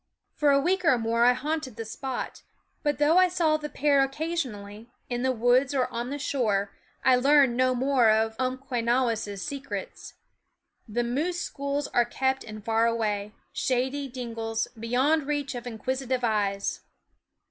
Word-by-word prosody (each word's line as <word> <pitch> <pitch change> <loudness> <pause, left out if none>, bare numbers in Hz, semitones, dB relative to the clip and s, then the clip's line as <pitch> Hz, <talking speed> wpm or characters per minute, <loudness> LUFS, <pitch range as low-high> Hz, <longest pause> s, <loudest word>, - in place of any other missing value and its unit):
For 300 -2 +2
a 275 0 +5
week 365 +6 +1
or 275 -7 +4
more 230 +1 +2
I 250 - +6
haunted 290 -1 -3
the 225 0 -5
spot; 260 +4 -5 0.4
but 295 -1 0
though 305 +4 +4
I 370 - +6
saw 340 -4 +2
the 300 -1 -6
pair 285 -1 +3
occasionally, 260 -8 -3 0.2
in 245 0 -1
the 260 +1 +2
woods 250 +3 +2
or 255 -2 +2
on 235 +1 -3
the 285 - -3
shore, 215 -8 0 0.3
I 260 - +6
learned 270 -1 +4
no 255 0 +2
more 255 -2 +3
of 220 +1 +2
Umquenawis' 240 -5 -1
secrets. 285 - -6 0.7
The 235 +3 -1
moose 310 +9 -1
schools 280 +1 -3
are 240 - +3
kept 265 +2 -1
in 215 -1 -9
far 225 +1 +2
away, 210 -3 -1 0.2
shady 265 +2 -1
dingles, 230 -3 -3
beyond 260 +6 0
reach 290 -2 -2
of 245 0 -6
inquisitive 255 +2 -2
eyes. 205 -3 0
255 Hz, 155 wpm, -27 LUFS, 230-280 Hz, 0.7 s, I